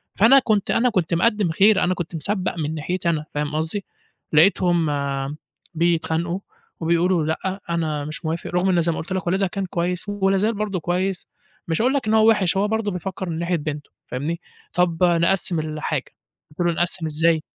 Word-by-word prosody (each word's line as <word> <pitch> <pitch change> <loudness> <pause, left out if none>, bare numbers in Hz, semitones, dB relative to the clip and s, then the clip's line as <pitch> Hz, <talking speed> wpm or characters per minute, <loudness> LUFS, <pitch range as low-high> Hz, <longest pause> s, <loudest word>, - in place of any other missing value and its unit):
فأنا 235 +7 +7
كُنت 215 -5 0
أنا 250 +2 +3
كُنت 185 -6 0
مقدّم 205 0 +2
خير، 195 +4 +4
أنا 180 - +2
كُنت 175 -2 -5
مسبَّق 185 +3 -1
من 155 -1 -2
ناحيتي 175 +4 -2
أنا، 155 -2 -1
فاهم 150 0 -2
قصدي، 160 +6 -2 0.5
لقيتهم، 175 0 +4 0.9
بيتخانقوا 170 +1 0 0.4
وبيقولوا 170 0 +2
لأ 190 +5 -2
أنا 155 -3 -1
مش 155 +3 -7
موافق، 160 +1 -3
رُغم 180 +2 +1
إن 175 -2 +3
زي 170 +1 +1
ما 160 - -4
قُلت 180 +4 -5
لك 185 -2 -3
والدها 190 +2 +2
كان 195 +1 -3
كويس 180 +3 -2
ولا 195 -1 +1
زال 215 +4 +1
برضه 205 -3 -2
كويس، 180 +3 -2 0.4
مش 165 +4 0
هاقول 255 +3 +3
لك 275 -6 -1
إن 215 - +2
هو 220 0 +6
وِحِش، 195 -4 +2
هو 200 +2 +2
برضه 220 -1 -1
بيفكّر 180 0 -5
من 160 -1 -3
ناحية 170 +1 0
بنتُه، 150 -1 -5 0.2
فاهمني، 150 +7 -3 0.3
طَب 180 -1 +1
نقسّم 175 0 +3
الحاجه 155 -2 -2 0.5
قُلت 150 - -21
له 170 - +2
نقسّم 175 0 -1
إزاي؟ 160 +1 +2
175 Hz, 185 wpm, -22 LUFS, 160-195 Hz, 0.9 s, فأنا